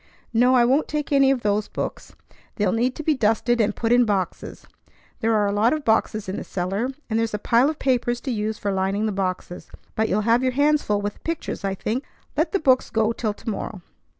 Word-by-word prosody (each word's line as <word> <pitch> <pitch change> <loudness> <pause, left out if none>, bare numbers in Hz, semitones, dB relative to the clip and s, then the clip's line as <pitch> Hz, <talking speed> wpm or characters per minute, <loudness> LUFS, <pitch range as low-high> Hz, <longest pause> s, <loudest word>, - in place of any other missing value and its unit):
"No, 250 +3 +4
I 240 -1 +5
won't 270 +5 +2
take 300 -1 -3
any 275 -1 +5
of 270 -3 +1
those 205 0 +1
books. - - -6 0.4
They'll 205 -3 +1
need 245 +3 0
to 310 - -6
be 310 - +3
dusted 235 0 +1
and 210 -1 0
put 230 0 -1
in 245 0 +6
boxes. 195 -5 -3 0.5
There 225 -1 +1
are 210 -1 +3
a 200 - 0
lot 215 +5 +3
of 305 -2 -3
boxes 220 -2 +1
in 190 - -3
the - - -4
cellar, 195 +7 -2 0.2
and 225 -1 0
there's 225 -2 -1
a - - -1
pile 235 +6 +3
of 310 - -4
papers 245 -2 0
to 270 - -3
use 215 -1 -2
for 200 - -2
lining 195 +2 0
the 215 - 0
boxes. 185 -2 -4 0.2
But 220 0 0
you'll 210 - +1
have 230 +3 +3
your 255 -1 0
hands 295 +2 +3
full 205 -1 -1
with 205 0 -2
the - - -23
pictures, 330 -9 -4
I 195 -1 -1
think. 230 +7 -2 0.3
Let 315 +4 +1
the 395 - +2
books 260 -5 +3
go 220 0 +1
till 220 -2 -2
to - - -18
morrow." 205 -3 -4
225 Hz, 235 wpm, -23 LUFS, 205-255 Hz, 0.5 s, in